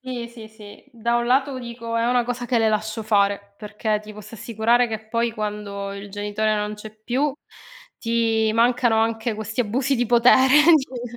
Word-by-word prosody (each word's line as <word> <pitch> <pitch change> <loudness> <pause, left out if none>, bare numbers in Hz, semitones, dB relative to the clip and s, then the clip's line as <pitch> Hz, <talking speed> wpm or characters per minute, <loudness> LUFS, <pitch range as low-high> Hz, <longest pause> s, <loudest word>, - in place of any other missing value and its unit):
Sì, 250 -2 -6
sì, 230 -2 -12
sì 215 -2 -14
da 235 0 -1
un 240 - -1
lato 265 +2 +1
dico 235 -1 -6
è 230 +1 +1
una 245 0 +2
cosa 245 0 -4
che 250 - 0
le 225 -1 +3
lascio 215 +1 -2
fare, 200 -1 0
perché 215 0 -2
ti 215 0 -11
posso 210 +2 -11
assicurare 230 +2 +1
che 220 -1 -7
poi 230 +1 0
quando 205 -2 -5
il 200 +1 -8
genitore 205 +2 -1
non 210 0 -2
c'è 210 0 -11
più 250 +7 -1 0.7
ti 225 -2 +1
mancano 240 0 +3
anche 225 0 -1
questi 220 +1 -7
abusi 260 +5 0
di 245 -1 0
potere, 250 +3 +5 0.2
sì. 245 -4 -5
225 Hz, 185 wpm, -22 LUFS, 215-240 Hz, 0.7 s, potere